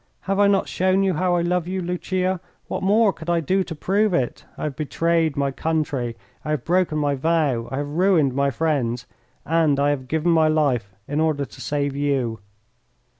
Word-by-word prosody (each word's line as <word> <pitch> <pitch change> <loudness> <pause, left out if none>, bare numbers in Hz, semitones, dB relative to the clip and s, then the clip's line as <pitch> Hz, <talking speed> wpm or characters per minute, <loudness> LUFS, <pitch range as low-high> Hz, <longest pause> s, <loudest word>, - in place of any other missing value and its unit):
"Have 195 +1 -1
I 205 - +6
not 200 -1 +2
shown 190 +1 +1
you 190 -1 +2
how 180 +2 +1
I 170 - +1
love 175 0 0
you, 190 +1 -2
Lucia? 185 +1 -1 0.3
What - - -3
more 205 +1 +3
could 165 +1 -8
I 170 -1 +3
do 190 +5 +1
to 165 - -7
prove 200 +4 +1
it? 125 -5 -2
I - - -6
have 150 -3 -3
betrayed 160 +1 0
my 140 -1 +1
country, 140 -6 -2 0.3
I - - -6
have 150 -5 -1
broken 175 -3 +1
my 145 -1 +1
vow, 140 -5 0
I 135 - -4
have 145 0 -2
ruined 160 -4 +3
my 140 +1 +1
friends, 125 -4 -1 0.4
and 160 -3 +2
I 145 +1 +3
have 130 -3 -3
given 160 +4 +1
my 160 -1 +4
life 135 -11 +1
in 145 +2 -1
order 155 -3 +1
to - - -13
save 145 -1 -1
you." 135 -6 -1
155 Hz, 200 wpm, -23 LUFS, 140-180 Hz, 0.4 s, I